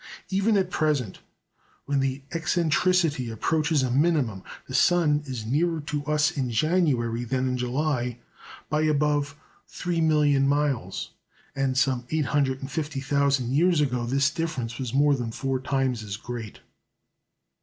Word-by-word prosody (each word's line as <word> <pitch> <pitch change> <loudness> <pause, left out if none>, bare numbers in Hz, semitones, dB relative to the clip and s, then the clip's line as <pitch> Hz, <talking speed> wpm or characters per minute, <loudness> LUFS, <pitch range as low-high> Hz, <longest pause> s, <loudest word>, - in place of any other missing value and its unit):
Even 200 +3 +2
at 185 -1 0
present, 145 - 0 0.7
when 140 -1 0
the 135 0 -1
eccentricity 165 -4 +1
approaches 150 +5 0
a 125 - -1
minimum, 135 - +1 0.3
the 130 - -8
sun 150 +1 +3
is 125 -5 -5
nearer 160 +7 +1
to 145 -1 -4
us 150 0 +2
in 130 -3 -2
January 120 -4 +1
than 130 +2 -1
in 130 - -1
July 125 -1 -1 0.5
by 150 +1 0
above 150 -1 +1 0.3
three 175 -2 -2
million 150 -3 +3
miles, 140 -9 -1 0.4
and 135 -1 0
some 130 -2 +1
850,000 140 -2 0
years 170 +3 +3
ago 125 -5 0
this 140 +3 +2
difference 140 -8 -3
was 130 -3 -3
more 145 +2 +4
than 120 -4 -2
four 135 +2 -2
times 130 -3 -1
as 100 -2 -5
great. 115 -2 -7
140 Hz, 135 wpm, -26 LUFS, 125-155 Hz, 0.7 s, more